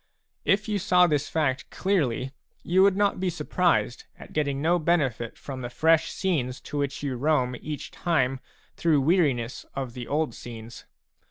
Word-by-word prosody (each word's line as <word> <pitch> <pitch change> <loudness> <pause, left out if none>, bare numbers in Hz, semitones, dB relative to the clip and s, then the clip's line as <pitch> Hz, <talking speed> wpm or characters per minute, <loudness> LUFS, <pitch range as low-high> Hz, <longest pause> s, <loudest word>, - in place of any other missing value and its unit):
If 200 +2 +2
you 210 -1 0
saw 180 0 +5
this 150 -3 0
fact 130 -5 -1
clearly, 135 - 0 0.3
you 185 +2 +3
would 195 0 +5
not 205 -2 +2
be 185 0 0
surprised 170 - 0
at - - -13
getting 140 -2 0
no 170 +4 +2
benefit 140 -9 0
from 135 -2 -7
the 120 - -4
fresh 160 +5 +3
scenes 135 -10 -1
to 145 - -5
which 140 0 -2
you 135 -3 -2
roam 130 -2 +1
each 150 -1 -6
time 135 -6 0 0.4
through 155 -4 +2
weariness 135 -7 +1
of 130 -3 -4
the 120 -1 -7
old 155 +2 0
scenes. 115 -1 -10
145 Hz, 165 wpm, -26 LUFS, 130-175 Hz, 0.4 s, saw